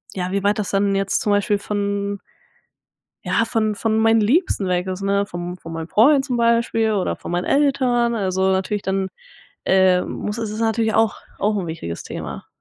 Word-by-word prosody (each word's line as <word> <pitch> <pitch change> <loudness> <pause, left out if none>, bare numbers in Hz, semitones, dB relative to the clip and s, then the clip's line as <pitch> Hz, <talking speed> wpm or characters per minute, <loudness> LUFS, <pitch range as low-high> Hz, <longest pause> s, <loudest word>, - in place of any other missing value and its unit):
ja, 180 0 -3
wie 200 0 -1
weit 205 +2 +2
das 205 - -2
dann 200 0 +1
jetzt 195 0 0
zum 210 - 0
Beispiel 205 +1 +2
von 200 -1 -2 1.0
ja 230 - +1
von 220 -2 0
von 220 +1 0
meinen 225 0 +4
Liebsten 215 - +1
weg 180 +1 0
ist 185 +1 -4
ne, 200 0 +1
vom 175 -1 -6
von 165 -1 -9
meinen 165 +1 -5
Freund 270 +5 +5
zum 250 -3 -2
Beispiel 230 -1 +2
oder 190 -3 -1
von - - -7
meinen 175 +1 0
Eltern, 250 -4 +2
also 190 -2 +1
natürlich 190 +2 -1
dann, 190 0 -1 0.6
äh, 185 -1 +4
muss 210 +2 -5
es 220 -2 -3
ist 215 - -5
natürlich 225 -1 +1
auch 225 -1 +3 0.2
auch 210 +1 +1
'n 185 -3 -2
wichtiges 85 - -5
Thema. - - -7
205 Hz, 190 wpm, -21 LUFS, 190-225 Hz, 1.0 s, Freund